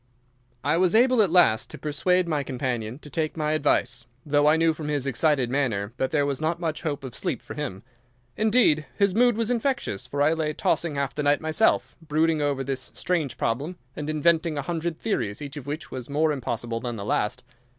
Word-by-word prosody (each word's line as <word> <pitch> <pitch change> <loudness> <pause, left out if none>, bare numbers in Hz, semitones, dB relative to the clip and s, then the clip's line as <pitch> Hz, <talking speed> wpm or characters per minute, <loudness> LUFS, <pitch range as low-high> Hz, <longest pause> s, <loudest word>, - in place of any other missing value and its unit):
I 150 +3 +2
was 185 +2 +3
able 250 0 +5
at 200 - +3
last 145 -10 +4
to - - -8
persuade 175 +5 +1
my 155 -3 0
companion 125 -3 -3
to 150 - -12
take 155 +2 -2
my 150 -1 0
advice, 145 -5 0 0.2
though 145 0 +3
I 155 +1 +5
knew 165 0 +3
from 155 -1 -6
his 145 -3 -1
excited 135 -1 +1
manner 115 -7 -1
that 130 - 0
there 145 -2 +1
was 140 0 -2
not 165 +2 0
much 160 -3 -2
hope 145 -4 -3
of 130 -3 -7
sleep 175 +6 -2
for - - -9
him. 130 -10 -5 0.5
Indeed, 215 -9 +3
his 200 -2 +3
mood 240 +1 +4
was 230 +1 0
infectious, 240 - -1
for 145 +3 0
I 155 +2 +4
lay 155 -2 -1
tossing 160 0 0
half 140 -1 -1
the 150 - -2
night 145 0 +3
myself, 160 +7 +1
brooding 160 0 +1
over 140 -2 0
this 130 -1 -3
strange 155 -9 -1
problem, 145 +10 -2 0.2
and 150 0 -4
inventing 160 +1 +2
a 140 - -2
hundred 165 +1 -3
theories, 110 - -2
each 145 -1 -7
of 145 -2 -8
which 150 +2 -5
was 130 -1 -6
more 155 +2 +2
impossible 120 -4 -3
than 120 -1 -4
the 100 -2 -6
last. 110 +4 -1
150 Hz, 210 wpm, -25 LUFS, 135-165 Hz, 0.5 s, able